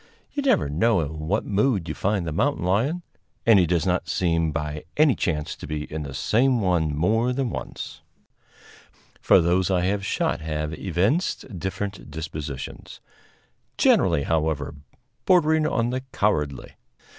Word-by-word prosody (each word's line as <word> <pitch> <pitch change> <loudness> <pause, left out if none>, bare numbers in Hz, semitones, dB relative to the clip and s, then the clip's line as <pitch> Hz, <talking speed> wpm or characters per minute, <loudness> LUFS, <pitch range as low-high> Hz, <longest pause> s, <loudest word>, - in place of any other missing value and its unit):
You 285 - -2
never 260 - +2
know 90 +7 +2
in 80 +1 -5
what 105 +5 0
mood 105 -3 +1
you - - -3
find 100 -2 -1
the 80 - -3
mountain 140 - 0
lion, 130 - +1 0.4
and 115 -4 +7
he 90 - +3
does 85 0 +1
not 90 -1 0
seem 85 -3 +1
by 75 -1 -4
any 150 -2 +5
chance 75 -9 -2
to - - -9
be 75 0 -3
in 80 - -3
the 70 -2 -6
same 125 - +2
one 85 -7 +1
more 110 +9 +2
than 130 -2 -1
once, - - -7 1.2
for - - +6
those 90 +3 +2
I 90 -2 +2
have 100 +2 0
shot - - -1
have 75 0 -3
evinced 95 - -1
different 95 0 -4
dispositions; 75 -3 -7 0.8
generally, 70 - +4
however, 75 -2 -1 0.5
bordering 160 -4 +4
on 120 -5 0
the 130 +1 -2
cowardly. 75 -9 -1
90 Hz, 150 wpm, -24 LUFS, 80-115 Hz, 1.2 s, and